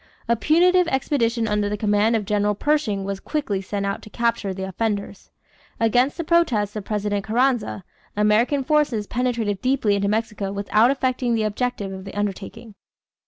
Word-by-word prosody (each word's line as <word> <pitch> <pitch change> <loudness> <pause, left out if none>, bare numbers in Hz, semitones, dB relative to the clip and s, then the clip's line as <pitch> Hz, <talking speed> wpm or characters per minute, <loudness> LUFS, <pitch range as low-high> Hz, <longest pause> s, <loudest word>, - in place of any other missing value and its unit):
A 235 - +3
punitive 350 +7 +3
expedition 240 -5 0
under 210 -1 0
the 210 - -2
command 210 +2 +2
of 215 -2 -1
General 210 0 +1
Pershing 235 -7 0
was 195 0 -4
quickly 220 -11 -2
sent 200 +1 -3
out 200 0 -2
to - - -12
capture 230 -3 -1
the 190 0 -5
offenders. 200 0 -3 0.5
Against 245 +4 +2
the 335 - -2
protests 255 - +1
of 210 -2 -5
President 205 -1 -2
Carranza, 230 -2 0 0.3
American 220 +7 +2
forces 270 -7 +1
penetrated 235 -4 -1
deeply 255 -5 +1
into 200 0 0
Mexico 210 -2 -2
without 210 +3 +2
effecting 255 -3 0
the 220 - 0
object 245 +3 -2
of 190 -1 -6
the 195 - -9
undertaking. 205 +2 -5
215 Hz, 165 wpm, -22 LUFS, 205-250 Hz, 0.5 s, A